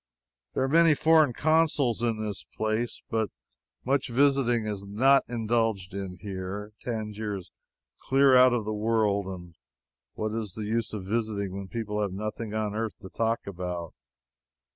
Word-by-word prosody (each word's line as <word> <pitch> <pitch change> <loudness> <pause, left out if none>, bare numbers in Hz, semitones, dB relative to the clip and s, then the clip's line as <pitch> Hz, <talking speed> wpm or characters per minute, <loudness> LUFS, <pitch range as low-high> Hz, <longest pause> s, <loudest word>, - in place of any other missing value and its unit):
There - - +1
are - - +1
many 165 +2 +5
foreign 155 -2 +5
consuls 150 -4 +2
in 110 -2 0
this 105 -2 -4
place, 110 +2 -1
but 110 -3 0 0.6
much 135 +1 +1
visiting 125 -3 +3
is 105 -2 -3
not 135 +7 +4
indulged 115 -5 0
in. 95 -2 -5 0.7
Tangier 110 -3 -3
is 90 - -11 0.6
clear 135 0 +5
out 125 0 +7
of 120 -3 0
the 110 - -2
world, 105 -2 +1
and 90 -2 -8 0.6
what 110 0 -2
is 110 -4 -3
the 110 - -4
use 115 +2 -1
of 95 -3 -6
visiting 105 -2 -1
when 100 0 -6
people 105 -1 -3
have 100 -3 -1
nothing 110 +2 -4
on 105 -1 -1
earth 110 0 -3
to 95 - -9
talk 115 +2 -1
about? 90 -3 -5
110 Hz, 155 wpm, -28 LUFS, 100-120 Hz, 0.7 s, out